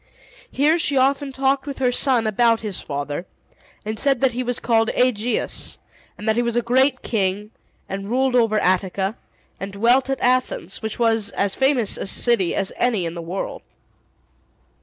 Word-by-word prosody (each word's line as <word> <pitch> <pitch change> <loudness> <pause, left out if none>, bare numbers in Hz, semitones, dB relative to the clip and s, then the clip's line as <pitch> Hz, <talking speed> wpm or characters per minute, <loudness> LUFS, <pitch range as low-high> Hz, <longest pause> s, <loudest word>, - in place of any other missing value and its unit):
Here 305 +5 +2
she 285 -4 0
often 275 +1 +2
talked 270 +1 0
with 280 - -5
her 255 -2 +1
son 245 -2 +2
about 230 +2 +2
his 210 -4 -3
father, 145 +4 -5 0.6
and 215 0 -4
said 275 -3 +3
that 265 -2 +3
he 245 +2 -3
was 245 -1 -2
called 225 -1 +2
Aegeus, 245 -2 0 0.4
and 210 - -7
that 220 - +3
he 240 - +2
was 235 -1 -1
a 240 - +1
great 260 +2 +2
king, 205 -1 -1 0.4
and 195 +1 -5
ruled 260 +2 +1
over 225 -3 +3
Attica, 190 +2 0 0.4
and 195 0 -6
dwelt 240 +6 +3
at 270 - -1
Athens, 250 -7 0
which 220 -1 -4
was 225 -3 +2
as 200 -1 -1
famous 265 -5 +1
a - - -4
city 210 -3 +1
as 195 - -1
any 225 -8 +1
in 165 - -4
the 170 - -6
world. 175 +4 -5
230 Hz, 175 wpm, -21 LUFS, 200-255 Hz, 0.6 s, said